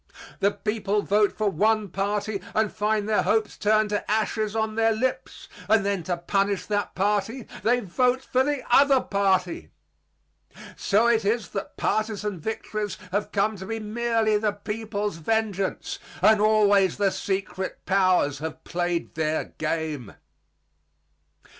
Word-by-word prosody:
The 200 - +4
people 210 -1 -1
vote 205 0 +3
for 215 - +1
one 210 +3 +2
party 200 +2 -2
and 215 -1 +1
find 210 0 0
their 215 -1 +2
hopes 220 -1 +1
turned 215 0 +2
to 205 - -2
ashes 215 0 0
on 220 -1 0
their 225 0 +2
lips; 255 +4 -3 0.2
and 215 -3 +4
then 200 -2 0
to 175 -2 -1
punish 195 +3 0
that 205 -1 -2
party, 210 +5 0 0.2
they 245 +2 +2
vote 250 +7 +1
for 255 0 +1
the 290 -1 -1
other 275 +1 +6
party. 190 -5 0 1.1
So 210 +3 +2
it 230 -2 +3
is 220 +3 0
that 195 - -6
partisan 210 -3 -1
victories 215 +2 -4
have 205 +2 -1
come 205 +1 +1
to 190 0 -8
be 225 +1 -3
merely 220 0 +1
the 210 -1 0
people's 210 -1 -4
vengeance; 200 +1 -1 0.2
and 215 -1 +6
always 205 -3 +4
the 200 -1 +2
secret 190 -1 -4
powers 185 -7 +2
have 160 0 -6
played 175 -1 -2
their 155 -1 -2
game. 155 -7 -3
210 Hz, 140 wpm, -25 LUFS, 195-220 Hz, 1.1 s, other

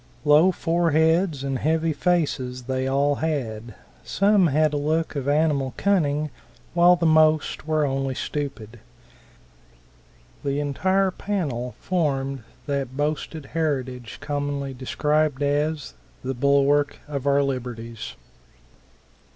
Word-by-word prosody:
Low 150 +5 +6
foreheads 165 -2 +1
and 135 -2 -2
heavy 160 +2 +1
faces 140 -8 0
they 130 +1 -2
all 140 +1 +2
had; 120 -8 -3 0.3
some 200 -2 +3
had 155 +1 +2
a - - +1
look 155 +2 -1
of 140 -1 -3
animal 145 -3 +1
cunning, 155 -7 +1 0.4
while 175 +1 +6
the 170 -1 -1
most 155 -1 +3
were 155 -1 +2
only 135 -1 -1
stupid. 125 -7 -5 1.6
The 140 0 -1
entire 185 +7 +1
panel 145 -13 -3
formed 135 -7 -1 0.2
that 140 -3 -3
boasted 150 0 -2
heritage 130 -7 -2
commonly 145 -2 -3
described 150 +2 0
as 150 +1 -1 0.3
the 130 +1 -2
"bulwark 140 +2 +2
of 140 -2 -4
our 140 0 +4
liberties." 120 -4 -5
145 Hz, 110 wpm, -24 LUFS, 135-160 Hz, 1.6 s, Low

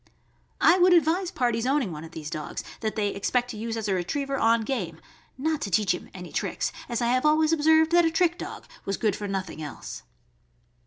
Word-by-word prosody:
I 360 - +5
would 360 0 +6
advise 340 +2 +3
parties 240 -4 0
owning 270 -8 +1
one 155 -1 -7
of 165 - -9
these 155 -2 -7
dogs 155 -3 -5 0.2
that 220 -1 -2
they 210 -2 +1
expect 245 +5 -1
to 220 - -8
use 225 +1 -3
as 220 -1 -3
a 195 - +1
retriever 275 +10 -1
on 230 -2 +3
game, 195 -10 -3 0.4
not 310 +3 -1
to 200 - -2
teach 200 0 +2
him 180 - -7
any 180 -2 -9
tricks, - - -2 0.2
as 240 0 -1
I - - +2
have 255 +1 +2
always 310 +1 +4
observed 320 +1 +4
that 345 0 +6
a - - +4
trick 345 +1 +1
dog - - -7 0.2
was 195 0 -2
good 210 -4 +1
for 205 - -5
nothing 190 -4 -4
else. 150 -2 -7
235 Hz, 215 wpm, -26 LUFS, 195-310 Hz, 0.4 s, would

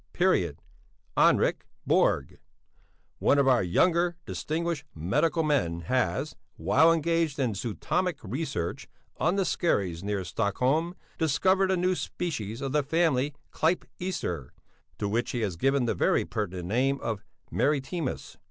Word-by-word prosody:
Henrik - - +3 0.2
Borg, 70 -1 +2 0.8
one 145 - +3
of 140 -1 +3
our 125 -5 +5
younger 170 - +2
distinguished 165 0 -2
medical 150 - +1
men 125 - +1
has, 130 - -1 0.2
while 130 - +4
engaged 165 -2 +1
in 130 -6 0
zootomic 145 - -1
research 120 - -3 0.3
on 175 +4 +1
the 195 -1 +1
skerries 95 - 0
near 100 -1 -1
Stockholm, 125 - 0 0.2
discovered 185 +5 +3
a 190 - +2
new 180 +1 +2
species 125 - -4
of 135 -1 -2
the 150 +1 +3
family 145 -2 +1 0.2
Clypeaster, 160 - -2 0.5
to 105 - -2
which 115 +4 0
he 120 - -1
has 100 -5 -1
given 135 +7 +2
the 115 - +1
very - - +2
pertinent 90 -4 -4
name 135 +5 +1
of 110 -4 -3 0.3
maritimus. 145 +1 -1
135 Hz, 125 wpm, -28 LUFS, 105-165 Hz, 0.8 s, our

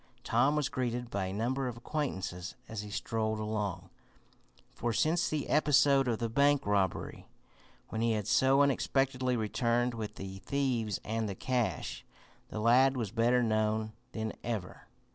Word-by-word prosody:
Tom 145 +2 +3
was 150 -2 +1
greeted 125 -3 -3
by 100 -1 -1
a - - -4
number 125 +6 -1
of 120 -1 -5
acquaintances 100 - -3
as 110 -2 -5
he 105 - -8
strolled 110 0 -1
along, 105 -3 -3 0.8
for, 120 +1 -2
since 160 +8 +2
the 150 -2 -2
episode 140 -2 +4
of 115 -2 +1
the 115 - -1
bank 140 +4 +3
robbery, 100 -2 -1 0.6
when 110 - -3
he 115 0 +2
had 105 -2 -2
so 135 +2 +4
unexpectedly 130 -2 +1
returned 120 +2 +1
with 110 -2 -5
the 95 0 -7
thieves 120 -5 -1
and 110 0 -1
the 100 - -4
cash, 125 +2 -2 0.5
the 110 - -5
lad 130 +4 +4
was 110 -6 -2
better 120 +2 +3
known 110 -1 0 0.2
than 110 -1 -3
ever. 110 -6 -5
115 Hz, 155 wpm, -31 LUFS, 110-130 Hz, 0.8 s, episode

